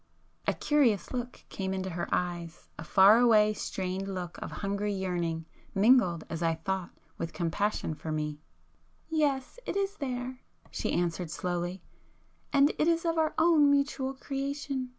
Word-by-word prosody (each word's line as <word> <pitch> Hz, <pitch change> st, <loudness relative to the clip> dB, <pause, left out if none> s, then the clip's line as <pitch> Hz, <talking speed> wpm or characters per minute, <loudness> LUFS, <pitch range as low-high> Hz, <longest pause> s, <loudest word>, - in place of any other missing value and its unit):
A -, -, +2 dB
curious 270 Hz, -9 st, +2 dB
look 250 Hz, 0 st, -5 dB
came 190 Hz, -1 st, -3 dB
into 190 Hz, 0 st, -3 dB
her 170 Hz, +1 st, -3 dB
eyes,—a 170 Hz, -2 st, -3 dB
far 195 Hz, +7 st, +6 dB
away 215 Hz, -3 st, +5 dB
strained 190 Hz, -1 st, -3 dB
look 180 Hz, -2 st, -5 dB
of -, -, -4 dB
hungry 200 Hz, +1 st, -2 dB
yearning, 175 Hz, -4 st, -2 dB, 0.3 s
mingled, 195 Hz, -5 st, +4 dB
as 165 Hz, 0 st, -5 dB
I 165 Hz, -1 st, +2 dB
thought, 185 Hz, +2 st, -3 dB, 0.3 s
with 165 Hz, -, -4 dB
compassion 175 Hz, +1 st, -1 dB
for 155 Hz, +1 st, -6 dB
me. 150 Hz, -1 st, -2 dB, 0.7 s
"Yes, 295 Hz, -, 0 dB
it -, -, -1 dB
is 400 Hz, +1 st, -1 dB
there!" 255 Hz, -2 st, -4 dB, 0.3 s
she -, -, -2 dB
answered 175 Hz, 0 st, -1 dB
slowly—"And 180 Hz, -, -2 dB
it 305 Hz, -, +3 dB
is 335 Hz, 0 st, +2 dB
of 330 Hz, -1 st, +1 dB
our 315 Hz, -1 st, +1 dB
own 320 Hz, -3 st, +5 dB
mutual 280 Hz, -1 st, +1 dB
creation. 275 Hz, -1 st, -3 dB
200 Hz, 145 wpm, -30 LUFS, 175-275 Hz, 0.7 s, far